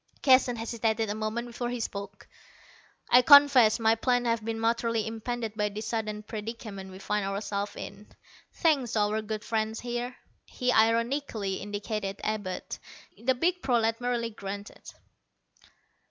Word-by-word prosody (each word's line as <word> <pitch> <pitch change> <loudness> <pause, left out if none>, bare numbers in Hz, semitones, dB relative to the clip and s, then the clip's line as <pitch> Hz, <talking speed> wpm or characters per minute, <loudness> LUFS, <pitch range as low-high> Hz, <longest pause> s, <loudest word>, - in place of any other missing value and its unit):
Keston 255 -2 +5
hesitated 225 -1 -1
a - - -1
moment 220 +2 -3
before 240 0 -4
he 245 0 -3
spoke. 200 -2 -6 0.8
"I 250 - +8
confess 280 -5 +7
my 225 0 +4
plans 245 +2 +1
have 230 -2 0
been 225 0 -3
materially 230 -1 +1
impeded 225 0 -4
by 210 -1 0
this 210 +2 -6
sudden 215 -2 -3
predicament 210 -2 -7
we 185 - -10
find 210 +1 -1
ourselves 200 +1 -3
in, 200 +1 -9 0.4
thanks 275 -8 +1
to 220 - +1
our 210 +1 +1
good 215 0 -5
friend 220 0 -1
here." 245 +1 -4 0.3
He 250 -1 -1
ironically 230 -3 +1
indicated 205 -1 -4
Abud. 205 -4 -3 0.4
The 260 +2 0
big 355 +7 0
prolat 230 -4 +1
merely 240 -1 -1
grunted. 200 -1 -8
225 Hz, 140 wpm, -28 LUFS, 210-240 Hz, 0.8 s, I